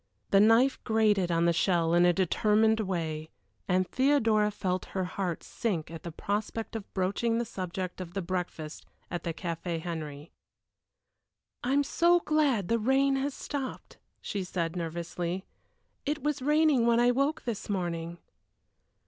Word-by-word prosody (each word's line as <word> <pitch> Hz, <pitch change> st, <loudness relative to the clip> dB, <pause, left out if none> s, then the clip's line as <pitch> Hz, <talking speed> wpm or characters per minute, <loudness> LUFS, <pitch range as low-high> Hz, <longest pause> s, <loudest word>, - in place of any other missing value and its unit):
The 195 Hz, -, +6 dB
knife 225 Hz, +6 st, +4 dB
grated 210 Hz, -5 st, +2 dB
on 170 Hz, 0 st, +2 dB
the 170 Hz, -, +4 dB
shell 170 Hz, -1 st, +2 dB
in 175 Hz, +1 st, +5 dB
a -, -, +6 dB
determined 210 Hz, +4 st, +3 dB
way, 160 Hz, -6 st, -2 dB, 0.4 s
and 185 Hz, 0 st, +2 dB
Theodora 225 Hz, -6 st, +3 dB
felt 185 Hz, -3 st, -2 dB
her 190 Hz, -, +1 dB
heart 180 Hz, -1 st, -3 dB
sink 170 Hz, -9 st, -3 dB
at 165 Hz, -1 st, -7 dB
the 170 Hz, -, -6 dB
prospect 210 Hz, +6 st, -3 dB
of 215 Hz, -3 st, -6 dB
broaching 200 Hz, +5 st, +1 dB
the 235 Hz, -, 0 dB
subject 185 Hz, -2 st, -5 dB
of 175 Hz, 0 st, -8 dB
the 195 Hz, -, 0 dB
breakfast 170 Hz, -4 st, -4 dB, 0.2 s
at 175 Hz, -2 st, -2 dB
the 170 Hz, -, -2 dB
Café 170 Hz, 0 st, -4 dB
Henry. 155 Hz, -3 st, -6 dB, 1.3 s
"I 250 Hz, +2 st, 0 dB
am 285 Hz, +1 st, +4 dB
so 345 Hz, +5 st, +3 dB
glad 290 Hz, -, +1 dB
the 230 Hz, 0 st, +2 dB
rain 270 Hz, +4 st, +3 dB
has 275 Hz, +1 st, -2 dB
stopped," 275 Hz, -3 st, -6 dB, 0.2 s
she 200 Hz, -2 st, -3 dB
said, 170 Hz, -2 st, -2 dB
nervously. 170 Hz, +2 st, -3 dB, 0.6 s
"It 295 Hz, +1 st, -2 dB
was 295 Hz, -2 st, -1 dB
raining 295 Hz, -3 st, +3 dB
when 235 Hz, 0 st, +4 dB
I 245 Hz, +1 st, +5 dB
woke 275 Hz, +5 st, 0 dB
this 230 Hz, -4 st, -4 dB
morning." 170 Hz, -3 st, -2 dB
195 Hz, 155 wpm, -29 LUFS, 170-235 Hz, 1.3 s, The